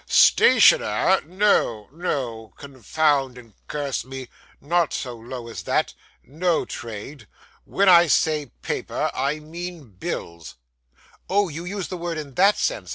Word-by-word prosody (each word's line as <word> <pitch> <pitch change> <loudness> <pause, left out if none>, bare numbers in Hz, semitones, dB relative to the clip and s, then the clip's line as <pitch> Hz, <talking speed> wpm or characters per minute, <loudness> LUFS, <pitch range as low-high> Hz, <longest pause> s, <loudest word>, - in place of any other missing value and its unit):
'Stationer! 105 - +5
No, 180 - +1
no; 125 - -4
confound 140 0 -1
and 115 -3 -14
curse 140 -5 -3
me! 130 0 -8 0.3
Not 170 +2 0
so 125 -3 -4
low 120 +1 -8
as 115 - -7
that. - - 0 0.3
No 170 +4 -1
trade. 115 +5 -8 0.4
When 200 +1 +1
I 175 -1 +7
say 155 -1 +1 0.2
paper, - - -2
I 140 +3 -1
mean 165 -3 -8
bills.' 85 -3 -6 0.7
'Oh, 200 0 +2
you 165 +3 -7
use 195 0 -4
the 185 - -5
word 170 -1 -4
in 145 -3 -7
that 195 +8 +4
sense. - - -2
145 Hz, 135 wpm, -23 LUFS, 125-175 Hz, 0.7 s, I